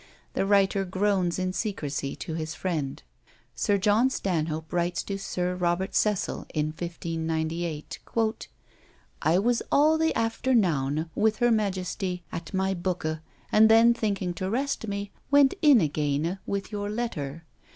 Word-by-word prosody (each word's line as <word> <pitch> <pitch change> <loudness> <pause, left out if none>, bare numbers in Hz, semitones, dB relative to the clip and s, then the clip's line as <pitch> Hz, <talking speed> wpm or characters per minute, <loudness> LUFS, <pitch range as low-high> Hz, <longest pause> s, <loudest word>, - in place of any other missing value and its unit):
The 195 - 0
writer 195 -1 +3
groans 190 -1 0
in 185 0 -1
secrecy 145 -10 -3
to 160 - -6
his 160 0 -4
friend. 155 -7 -3 0.5
Sir 205 -1 +1
John 210 +6 +3
Stanhope 160 -8 -2
writes 175 0 0
to 195 -1 -4
Sir 180 -2 -2
Robert 180 +1 -1
Cecil 210 -3 0
in 155 0 +1
1598: 165 -1 -3 1.2
"I 160 +3 +3
was 235 +4 +2
all 310 +2 +4
the 320 0 +3
afternowne 170 - +1
with 215 0 +2
her 240 0 +3
majestie, 190 -3 -1
at 170 - -6
my 190 0 0
booke; 175 -3 -2 0.3
and 220 +1 +6
then 225 +1 +7
thinking 200 -6 -1
to 185 +2 -3
rest 260 0 -1
me, 200 0 -4 0.2
went 285 -1 +5
in 295 -6 +7
agayne 150 +3 0
with 200 +1 -3
your 205 -1 -3
letter. 165 -10 -4
185 Hz, 140 wpm, -27 LUFS, 165-210 Hz, 1.2 s, then